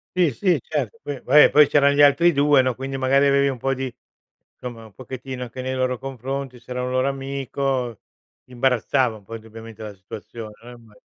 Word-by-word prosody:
Sì, 180 -3 +3
sì, 160 - +1
certo, 140 -7 -4
poi 145 -2 -5
va 150 +4 +6
eh - - +7
poi 150 -1 +6
c'eran 140 -1 +3
gli 145 - +4
altri 170 +5 +5
2 145 -1 +4
no, 130 -1 -1
quindi 135 +1 -5
magari 135 +1 +3
avevi 140 0 +3
un 135 -2 -2
po' 135 +3 -1
di 130 -1 -4 0.6
insomma 120 -2 -9
un 110 - -16
pochettino 130 +3 -8
anche 125 +1 -6
nei 130 0 -3
loro 130 -1 -1
confronti, 135 0 -6
s'era 125 +1 -5
un 125 - -3
loro 130 +1 +1
amico 135 -3 -3 0.4
imbarazzava 125 -1 0
un 105 - -18
po' 115 - -12
indubbiamente 115 0 -10
la 105 -2 -7
situazione 105 +3 -9
no, 120 - -12
imma 115 -3 -15
130 Hz, 200 wpm, -22 LUFS, 120-140 Hz, 0.6 s, eh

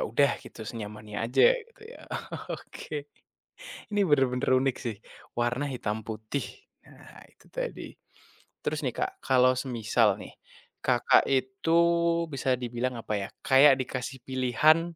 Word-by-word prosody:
udah 140 +4 +4
gitu 110 - -10
senyamannya 105 -1 -7
aja 120 - +2 0.2
gitu 465 -1 -21
ya. - - -14 0.5
Oke, 145 -2 -6 0.9
ini 205 - 0
bener-bener 135 -2 +2
unik 135 -1 +1
sih, 115 -3 -2 0.4
warna 120 +4 0
hitam 110 -5 -3
putih. 110 +5 -4 0.4
Nah - - -15
itu - - -25
tadi. - - -4 0.8
Terus - - -1
nih, - - -1
Kak, - - 0 0.2
kalau 130 0 +5
semisal 115 -3 +2
nih - - -10 0.5
Kakak 125 -2 +4
itu 130 +4 -2 0.6
bisa 135 -1 -2
dibilang, 125 +1 -2
apa 110 - -4
ya, 95 - -4 0.2
kayak 135 +1 +8
dikasih 130 +1 -5
pilihan 150 +7 +3
130 Hz, 130 wpm, -28 LUFS, 120-140 Hz, 0.9 s, kayak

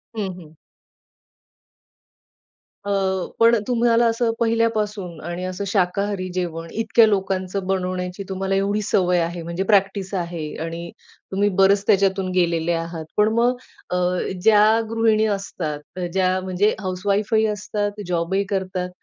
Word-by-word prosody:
हं, 205 -4 -2
हं. 160 -2 -15 2.3
अ, 200 - -3 0.5
पण 230 +1 +6
तुम्हाला 235 -1 +3
असं 230 0 +1
पहिल्यापासून 215 -6 0
आणि 175 +1 -4
असं 185 +2 -4
शाकाहारी 195 0 0
जेवण 165 -2 -3
इतक्या 225 +1 +4
लोकांचं 190 -1 -1
बनवण्याची 185 0 -2
तुम्हाला 190 0 -1
एवढी 200 +2 +1
सवय 180 -3 +2
आहे, 170 +1 -2
म्हणजे 170 +3 -3
प्रॅक्टिस 195 -1 +1
आहे, 170 -3 -3 0.2
आणि 170 +1 -6 0.4
तुम्ही 200 +2 +2
बरेच 195 +1 +4
त्याच्यातून 195 -1 +2
गेलेले 170 -2 +1
आहात. 165 -1 -4
पण 210 0 +5
मग 240 +2 +2 0.4
अ, - - 0 0.5
ज्या 210 +1 +6 0.2
गृहिणी 225 -1 +2
असतात, 160 -3 -6
ज्या 185 0 +2
म्हणजे 190 +3 +1
हाउस 185 -3 -4
वाईफही 210 +2 +2
असतात, 210 0 -3
जॉबही 180 +3 0
करतात, 185 -2 -2
195 Hz, 125 wpm, -22 LUFS, 180-210 Hz, 2.3 s, पण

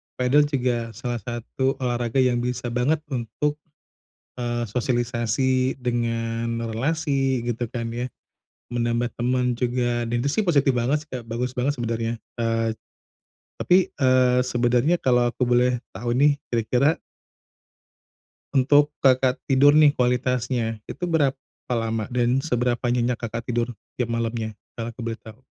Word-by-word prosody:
padel 140 +4 +3
juga 120 -5 -1
salah 120 -1 -3
satu 120 +3 -2
olahraga 120 0 0
yang 125 -1 +2
bisa 125 0 -3
banget 145 +6 +1
untuk, 145 +5 -2 0.8
eee, 120 0 -1
sosialisasi 125 +2 0
dengan 115 -1 -2
relasi, 135 -1 0
gitu 120 -1 -2
kan 115 -1 -4
ya, 120 +2 -3 0.6
menambah 120 0 0
temen 125 0 0
juga 120 -1 0
dan 120 +1 -1
itu 140 - +1
sih - - +3
positif 140 -5 +4
banget 130 +5 0
sih, 155 - -31
Kak, 120 -3 -6
bagus 120 +2 -2
banget 130 +3 -1
sebenarnya, 115 -1 -2 0.2
eee, 115 -1 +1 0.9
tapi, 185 +1 +3
eee, 130 -2 +3
sebenarnya 125 +6 +2
kalau 125 -2 +2
aku 125 -1 -1
boleh 125 0 +3 0.2
tahu 120 +3 -2
nih, 145 +3 +4 0.2
kira-kira 125 +6 +2 1.5
Untuk 145 +2 +4
Kakak 130 -1 +3
tidur 145 +2 +5
nih 150 -2 +6
kualitasnya, 125 -3 0
itu - - -7
berapa 145 -6 +1 0.4
lama, 115 -2 -1
dan 125 +1 +1
seberapa 125 -4 0
nyenyak 120 0 +1
Kakak 115 0 -4
tidur 120 0 -1 0.2
tiap 120 -2 -2
malamnya, 115 -2 -2 0.2
kalau 115 0 -5
aku 120 0 -8
boleh 115 -1 -4
tahu? 110 +2 -13
125 Hz, 135 wpm, -24 LUFS, 115-130 Hz, 1.5 s, nih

